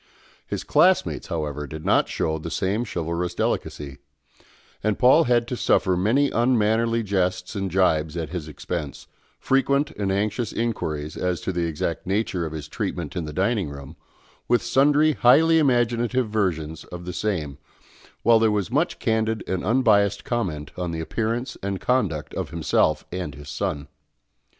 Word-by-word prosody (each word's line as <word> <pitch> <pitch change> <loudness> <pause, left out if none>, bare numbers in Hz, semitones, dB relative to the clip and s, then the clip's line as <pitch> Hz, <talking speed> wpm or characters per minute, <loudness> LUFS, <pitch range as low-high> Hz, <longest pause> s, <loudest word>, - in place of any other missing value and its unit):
His - - -4
classmates, 185 0 +2
however, 75 -4 -3
did 75 +3 -8
not - - +3
show 80 0 -1
the 85 - -6
same 100 +7 -1
chivalrous 85 -2 -3
delicacy; 70 -2 -3 0.8
and 105 0 +1
Paul 130 +6 +5
had 120 -1 +2
to 125 - -2
suffer 95 -5 +2
many 120 +10 +2
unmannerly 115 -1 +2
jests 95 -2 -1
and 95 -1 -2
gibes 85 -3 +1
at 80 -3 -3
his 85 -4 -5
expense, 75 -1 -5 0.3
frequent 140 +2 +1
and 100 -2 -2
anxious 105 +3 -1
inquiries 80 -10 -3
as 90 -1 -1
to - - -2
the 85 -2 -1
exact 80 +2 -3
nature 95 -4 -1
of - - -7
his 75 -2 -6
treatment 75 0 -4
in 85 -3 -2
the 75 - -6
dining 95 0 0
room, 70 +2 -9 0.5
with 120 -1 +2
sundry 145 +5 +4
highly 160 +6 +5
imaginative 120 -2 +2
versions 80 -7 -1
of 90 0 -9
the 90 - -5
same, 80 -8 -2 0.6
while 115 0 +6
there 110 0 +4
was 105 0 -1
much 150 +7 +1
candid 110 -2 0
and 95 -1 -2
unbiassed 105 -3 +3
comment 80 - -2
on 90 -1 -3
the 80 -1 -4
appearance 115 - -2
and 100 -1 -3
conduct 95 - 0
of - - -3
himself 80 -2 +1
and 90 -6 -4
his 75 0 -11
son. 75 0 -3
95 Hz, 160 wpm, -24 LUFS, 80-120 Hz, 0.8 s, while